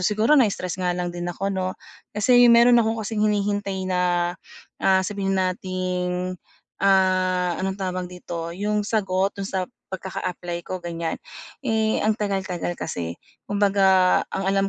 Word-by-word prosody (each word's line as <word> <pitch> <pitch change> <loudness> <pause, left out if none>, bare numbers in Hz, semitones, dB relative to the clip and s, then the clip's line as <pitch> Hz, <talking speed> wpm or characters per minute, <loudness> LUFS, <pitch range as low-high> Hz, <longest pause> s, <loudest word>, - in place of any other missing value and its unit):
siguro 215 +8 +2
na-stress 200 - +2
nga 180 -1 0
lang 175 -1 -2
din 175 0 -4
ako 195 +3 -2
'no. 185 -1 -2 0.4
Kasi 245 +3 +6
meron 235 +1 +7
akong 225 0 0
kasing 210 0 -2
hinihintay 205 -2 -1
na, 180 -1 +1 0.5
ah, 190 0 +3
sabihin 195 0 -1
nating, 185 -1 -2 0.4
ah, 185 -2 +2
anong 190 0 -1
tawag 185 -2 -3
dito 170 -2 -6
yung 210 +2 -1
sagot 195 -3 0
dun 200 - -5
sa 190 -1 -2 0.2
pagkaka-apply 180 -2 -4
ko 185 +2 -5
gan'yan, 170 -1 -4 0.5
eh, 220 -2 +1
ang 215 0 +3
tagal-tagal 190 -5 -2
kasi. 85 - -4 0.3
Kumbaga 195 -2 +4
ang 195 - -3
alam 195 0 +2
190 Hz, 140 wpm, -23 LUFS, 180-205 Hz, 0.5 s, meron